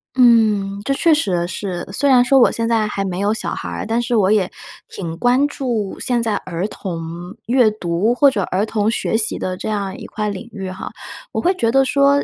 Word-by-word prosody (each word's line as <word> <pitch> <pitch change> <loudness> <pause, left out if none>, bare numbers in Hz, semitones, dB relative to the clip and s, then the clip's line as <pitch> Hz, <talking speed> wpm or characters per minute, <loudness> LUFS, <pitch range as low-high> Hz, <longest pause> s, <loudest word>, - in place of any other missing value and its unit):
嗯， 215 -5 +3
这 275 - 0
确 325 +4 +3
实 180 - 0
是， 180 -1 -5
虽 285 +6 +1
然 250 -2 +6
说 270 +2 +5
我 245 - +5
现 230 0 -2
在 225 -2 +1
还 195 -1 -3
没 185 -1 -3
有 200 +1 +1
小 220 - -3
孩 85 - -5
儿， 85 -1 -4
但 230 +2 0
是 240 0 -1
我 200 -3 +3
也 200 -4 +2 0.4
挺 165 -4 -6
关 250 +4 +3
注 235 -8 -3
现 245 -2 0
在 220 -2 0
儿 180 +2 -3
童 175 -1 -7
阅 245 -1 +4
读 210 +2 0
或 280 +2 +5
者 210 - -1
儿 190 +3 -1
童 215 -1 0
学 225 - -1
习 220 -1 +2
的 185 - -3
这 180 - -5
样 200 -3 -2
一 - - -9
块 210 -1 -3
领 205 +4 -7
域 195 -3 -6
哈。 185 - -7 0.4
我 - - -2
会 360 - +2
觉 230 -11 0
得 270 +1 +4
说， 280 +1 +3
215 Hz, 240 characters per minute, -19 LUFS, 190-245 Hz, 0.4 s, 然